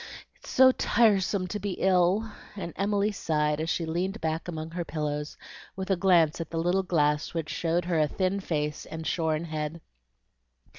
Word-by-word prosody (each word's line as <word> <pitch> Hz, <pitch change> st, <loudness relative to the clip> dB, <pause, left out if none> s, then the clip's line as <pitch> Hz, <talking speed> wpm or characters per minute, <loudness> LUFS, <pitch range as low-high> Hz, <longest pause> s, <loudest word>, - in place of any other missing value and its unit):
It's -, -, -14 dB
so 260 Hz, 0 st, +6 dB
tiresome 200 Hz, -6 st, +2 dB
to 210 Hz, -, -3 dB
be 200 Hz, -1 st, -3 dB
ill!" 190 Hz, +4 st, +2 dB, 0.2 s
and 180 Hz, -4 st, -6 dB
Emily 205 Hz, +1 st, +1 dB
sighed 150 Hz, -5 st, 0 dB
as 160 Hz, -, -2 dB
she 165 Hz, 0 st, 0 dB
leaned 180 Hz, +6 st, -2 dB
back 160 Hz, +1 st, -2 dB
among 160 Hz, -2 st, -5 dB
her 175 Hz, +1 st, -3 dB
pillows, 150 Hz, -2 st, -4 dB, 0.4 s
with 190 Hz, 0 st, -4 dB
a -, -, +4 dB
glance 175 Hz, -4 st, +3 dB
at 165 Hz, -, -6 dB
the 165 Hz, -, -4 dB
little 175 Hz, +3 st, +2 dB
glass 150 Hz, -4 st, 0 dB
which 160 Hz, -2 st, -3 dB
showed 170 Hz, +1 st, 0 dB
her 170 Hz, -2 st, +1 dB
a 155 Hz, -, +3 dB
thin 190 Hz, +5 st, -1 dB
face 150 Hz, -5 st, -3 dB
and 160 Hz, 0 st, -7 dB
shorn 160 Hz, -1 st, 0 dB
head. 155 Hz, 0 st, -4 dB
170 Hz, 180 wpm, -28 LUFS, 155-190 Hz, 0.4 s, so